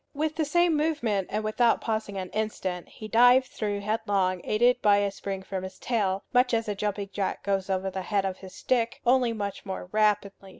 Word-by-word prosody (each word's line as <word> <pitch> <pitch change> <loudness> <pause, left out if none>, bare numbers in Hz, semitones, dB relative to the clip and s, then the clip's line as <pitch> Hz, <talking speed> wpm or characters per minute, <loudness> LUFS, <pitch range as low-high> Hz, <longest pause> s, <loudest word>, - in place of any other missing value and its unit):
With 305 +1 -1
the 315 - 0
same 345 +2 +3
movement, 285 - 0
and 215 +1 -2
without 230 +2 +2
pausing 215 -3 -3
an 185 -1 -5
instant, 190 -4 -3
he 215 - -9
dived 245 +4 +6
through 205 -4 -3
headlong, 200 -4 0
aided 245 +3 +2
by 205 -1 +5
a 200 -1 +1
spring 195 -1 -5
from 190 0 -4
his 190 0 -8
tail, 200 -5 -1
much 250 -1 +4
as 225 0 -1
a 210 - -1
jumping 200 0 -3
jack 195 -2 -2
goes 195 -1 -1
over 190 0 -1
the 190 - -4
head 200 +1 0
of 190 -1 -3
his 190 -1 -11
stick, 235 -2 0
only 245 -1 +4
much 205 -3 -4
more 190 -2 -6
rapidly. 210 -2 0
210 Hz, 205 wpm, -27 LUFS, 195-235 Hz, -, dived